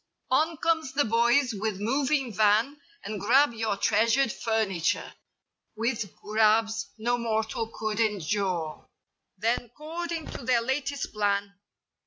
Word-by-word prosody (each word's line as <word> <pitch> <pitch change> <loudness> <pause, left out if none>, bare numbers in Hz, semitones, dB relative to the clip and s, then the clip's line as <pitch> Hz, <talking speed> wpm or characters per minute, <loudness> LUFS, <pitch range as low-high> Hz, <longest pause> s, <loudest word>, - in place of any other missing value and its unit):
On 315 +5 +2
comes 320 -4 0
the 290 +1 +2
boys 235 +3 +3
with 210 -1 -3
moving 270 +2 0
van 220 +8 +2 0.2
And 215 -2 -5
grab 255 +5 +4
your 220 -3 -1
treasured 230 +5 +2
furniture. 215 -8 -1 0.6
With 225 -3 -2
grabs 220 0 +1
no 240 +2 0
mortal 220 -1 -1
could 215 -1 -3
endure. 195 -6 -1 0.5
Then, 230 +3 0
'cording 330 +1 -4
to - - -7
their 240 -1 +2
latest 275 +3 -2
plan. 200 -1 0
225 Hz, 120 wpm, -27 LUFS, 210-265 Hz, 0.6 s, grab